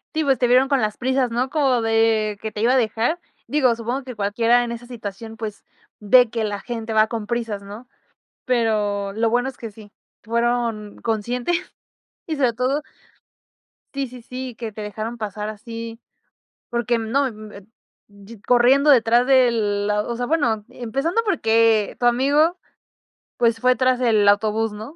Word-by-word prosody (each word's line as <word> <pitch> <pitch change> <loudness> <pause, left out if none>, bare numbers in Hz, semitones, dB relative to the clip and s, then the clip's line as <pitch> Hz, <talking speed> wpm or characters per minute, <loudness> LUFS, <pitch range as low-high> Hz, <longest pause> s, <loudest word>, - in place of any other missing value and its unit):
Sí, 315 - +1
pues 270 -3 +2
te 250 - +1
vieron 255 +2 +4
con 275 -2 +2
las 215 -2 -1
prisas, 260 -1 0
¿no?, 245 +3 -1
como 270 -5 +1
de 225 -2 +1
que 220 0 -5
te 210 - -5
iba 240 +3 +3
a - - +4
dejar. 235 +7 0 0.3
Digo, 265 -5 +2
supongo 240 +4 -4
que 255 -1 -8
cualquiera 230 +4 +2
en 240 - -4
esa 235 0 -7
situación, 225 -2 -8
pues, 215 -2 -7 0.3
ve 235 +3 +5
que 230 0 -2
la 205 -1 -3
gente 230 -2 -5
va 215 0 +4
con 225 -2 -4
prisas, 225 -3 -3
¿no? 210 +5 -10 0.6
Pero 210 -5 0
lo 225 +3 0
bueno 245 +3 +1
es 265 - -12
que 230 -2 -7
sí, 205 0 -15 0.3
fueron 230 -2 -1
conscientes, 240 +8 -1 0.7
y, 315 - -3
sobre 255 -4 +2
todo 255 +5 -1 1.1
Sí, 275 -1 -2
sí, 250 -1 -12
sí, 255 0 -7
que 225 -1 -6
te 215 +1 -8
dejaron 215 +3 -5
pasar 210 0 -4
así, 230 +1 -8 0.7
porque, 240 0 0
mm, 220 -1 -5
no, 275 +1 +1
mm, 215 0 -11
eh 200 -2 -12 0.5
yi 200 +2 -14
corriendo 255 +5 +4
detrás 240 -1 +4
de 260 -2 +5
la 210 -2 0
osea, 240 +2 -3
bueno, 240 -9 0
e - - -13
empezando 275 - 0
porque 225 - +2
tu - - -3
amigo, 285 +8 +3 0.8
pues 230 -2 +2
fue 255 +1 +3
tras 255 -1 +2
el 225 -5 +3
autobús, 215 +2 +1
¿no?, 215 +9 -9
230 Hz, 175 wpm, -22 LUFS, 215-255 Hz, 1.1 s, ve